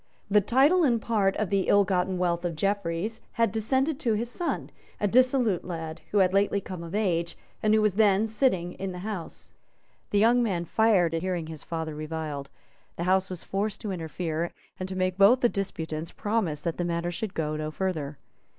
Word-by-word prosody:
The 210 Hz, 0 st, +6 dB
title 275 Hz, -, +4 dB
and 240 Hz, -6 st, +3 dB
part 210 Hz, -4 st, +1 dB
of 215 Hz, -3 st, -2 dB
the 195 Hz, -2 st, +1 dB
ill 200 Hz, 0 st, +5 dB
gotten 185 Hz, 0 st, 0 dB
wealth 175 Hz, -1 st, 0 dB
of 175 Hz, -2 st, -2 dB
Jeffreys 200 Hz, +3 st, -1 dB
had 230 Hz, -3 st, +2 dB
descended 265 Hz, +7 st, 0 dB
to 235 Hz, -7 st, +1 dB
his 235 Hz, +3 st, -3 dB
son, 345 Hz, +4 st, -3 dB, 0.3 s
a 205 Hz, -, +2 dB
dissolute 250 Hz, -4 st, +3 dB
lad, 165 Hz, -2 st, -6 dB
who 210 Hz, -, 0 dB
had 185 Hz, -2 st, +4 dB
lately 200 Hz, 0 st, +2 dB
come 185 Hz, -3 st, -7 dB
of 170 Hz, +3 st, -6 dB
age, 170 Hz, -5 st, 0 dB, 0.2 s
and 215 Hz, 0 st, +4 dB
who 215 Hz, -, +3 dB
was 210 Hz, -3 st, +3 dB
then 205 Hz, 0 st, +4 dB
sitting 210 Hz, -6 st, 0 dB
in 195 Hz, -1 st, -5 dB
the 180 Hz, +2 st, -7 dB
House. 200 Hz, -6 st, -6 dB, 0.6 s
The 205 Hz, -, +1 dB
young 235 Hz, +4 st, +5 dB
man 185 Hz, -7 st, 0 dB
fired 190 Hz, -4 st, +3 dB
at 165 Hz, -, -1 dB
hearing 180 Hz, -2 st, -2 dB
his 160 Hz, -2 st, -8 dB
father 160 Hz, -2 st, -4 dB
reviled. 155 Hz, -2 st, -5 dB, 0.5 s
The 170 Hz, -, -3 dB
House 190 Hz, +1 st, +2 dB
was 185 Hz, -2 st, -6 dB
forced 205 Hz, +2 st, -2 dB
to 210 Hz, -, -3 dB
interfere, 165 Hz, -1 st, -3 dB, 0.3 s
and 185 Hz, 0 st, -4 dB
to 190 Hz, -, -4 dB
make 185 Hz, 0 st, -1 dB
both 230 Hz, +6 st, +6 dB
the 240 Hz, -, +4 dB
disputants 165 Hz, -5 st, -4 dB
promise 200 Hz, -9 st, -1 dB
that 170 Hz, -2 st, -2 dB
the 175 Hz, -, -1 dB
matter 170 Hz, 0 st, -1 dB
should 195 Hz, +3 st, -4 dB
go 155 Hz, -1 st, -1 dB
no 155 Hz, 0 st, -3 dB
further. 155 Hz, -4 st, -3 dB
190 Hz, 200 wpm, -27 LUFS, 170-215 Hz, 0.6 s, The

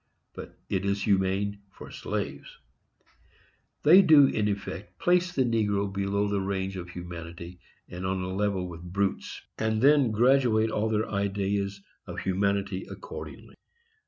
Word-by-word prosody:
—but -, -, -10 dB
it 95 Hz, -1 st, -1 dB
is 100 Hz, 0 st, -1 dB
humane 100 Hz, 0 st, +1 dB
for -, -, -12 dB
slaves. -, -, -5 dB, 1.3 s
They 175 Hz, +6 st, +8 dB
do, 155 Hz, -6 st, +7 dB
in 105 Hz, -5 st, 0 dB
effect, 100 Hz, -1 st, -5 dB
place 180 Hz, 0 st, +2 dB
the 135 Hz, -6 st, +1 dB
negro 105 Hz, -4 st, 0 dB
below 100 Hz, +1 st, 0 dB
the 100 Hz, -1 st, 0 dB
range 95 Hz, 0 st, -2 dB
of 90 Hz, -1 st, -7 dB
humanity, 85 Hz, 0 st, -8 dB, 0.3 s
and 90 Hz, +1 st, -7 dB
on 95 Hz, 0 st, -1 dB
a 90 Hz, 0 st, -4 dB
level 100 Hz, -2 st, -1 dB
with 85 Hz, -1 st, -9 dB
brutes, 95 Hz, +3 st, -3 dB, 0.2 s
and 110 Hz, 0 st, 0 dB
then 140 Hz, 0 st, +5 dB
graduate 115 Hz, -1 st, +3 dB
all 110 Hz, +1 st, 0 dB
their 110 Hz, 0 st, 0 dB
ideas 100 Hz, 0 st, -2 dB, 0.2 s
of -, -, -5 dB
humanity 100 Hz, 0 st, 0 dB
accordingly. -, -, -9 dB
100 Hz, 140 wpm, -27 LUFS, 95-110 Hz, 1.3 s, They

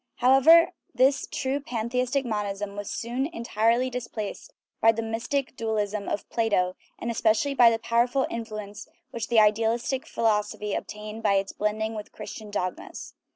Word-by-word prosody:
However, 270 Hz, +7 st, +6 dB, 0.2 s
this 270 Hz, +1 st, +3 dB
true 270 Hz, +1 st, -1 dB
pantheistic 250 Hz, 0 st, -1 dB
monism 205 Hz, -2 st, -3 dB
was 205 Hz, -1 st, -5 dB
soon 245 Hz, +4 st, -2 dB
entirely 235 Hz, -4 st, +1 dB
displaced 230 Hz, -4 st, -5 dB, 0.3 s
by 225 Hz, -, +7 dB
the 230 Hz, 0 st, -3 dB
mystic 235 Hz, +5 st, -2 dB
dualism 215 Hz, -3 st, -2 dB
of 205 Hz, -, -3 dB
Plato, 195 Hz, -5 st, +1 dB, 0.2 s
and 235 Hz, -, -3 dB
especially 230 Hz, +5 st, +2 dB
by 245 Hz, -3 st, +7 dB
the 225 Hz, -, +1 dB
powerful 240 Hz, +4 st, +1 dB
influ 220 Hz, -2 st, -4 dB
ence 205 Hz, +1 st, -10 dB, 0.2 s
which 230 Hz, -2 st, -4 dB
the 235 Hz, -2 st, +4 dB
idealistic 230 Hz, +5 st, +2 dB
philosophy 210 Hz, -2 st, 0 dB
obtained 210 Hz, +1 st, -6 dB
by 205 Hz, -3 st, +3 dB
its 195 Hz, 0 st, 0 dB
blending 215 Hz, +1 st, -1 dB
with 210 Hz, -1 st, -7 dB
Christian 215 Hz, -2 st, -8 dB
dogmas. 185 Hz, -3 st, -5 dB
225 Hz, 150 wpm, -26 LUFS, 210-250 Hz, 0.3 s, by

